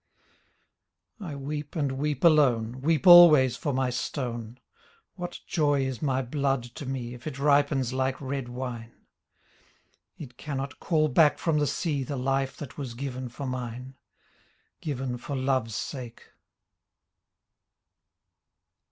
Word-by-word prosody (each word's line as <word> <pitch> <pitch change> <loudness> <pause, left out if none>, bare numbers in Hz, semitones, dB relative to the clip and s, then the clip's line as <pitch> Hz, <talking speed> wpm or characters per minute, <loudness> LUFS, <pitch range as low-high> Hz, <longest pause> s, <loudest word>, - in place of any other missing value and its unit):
I 170 -8 -6
weep 145 +1 -5
and 145 -4 0
weep 145 +4 -2
alone. 130 -7 +3
Weep 160 +4 +1
always 155 -8 +9
for 145 - -2
my 130 -1 0
stone. 120 -2 -4 0.5
What 175 -1 -6
joy 145 -4 +1
is 130 -4 -4
my 135 -3 0
blood 135 0 -1
to 120 +3 -9
me 125 -2 -4
If 125 +4 -10
it 140 - -5
ripens 140 -3 +2
like 130 0 -1
red 135 -2 -4
wine? 120 -2 -6 1.2
It 125 -5 -10
cannot 140 -2 -5
call 155 -3 +2
back 150 +2 +4
from 160 -3 0
the 145 - +1
sea 145 -4 -1
The 140 +2 -4
life 135 +1 -1
that 145 -1 -9
was 130 -4 -5
given 130 -1 -5
for 135 +4 -7
mine. 125 0 -5 0.9
Given 130 -4 -3
for 140 +3 -5
Love's 130 -4 0
sake. 125 -4 -7
135 Hz, 130 wpm, -27 LUFS, 125-145 Hz, 1.2 s, always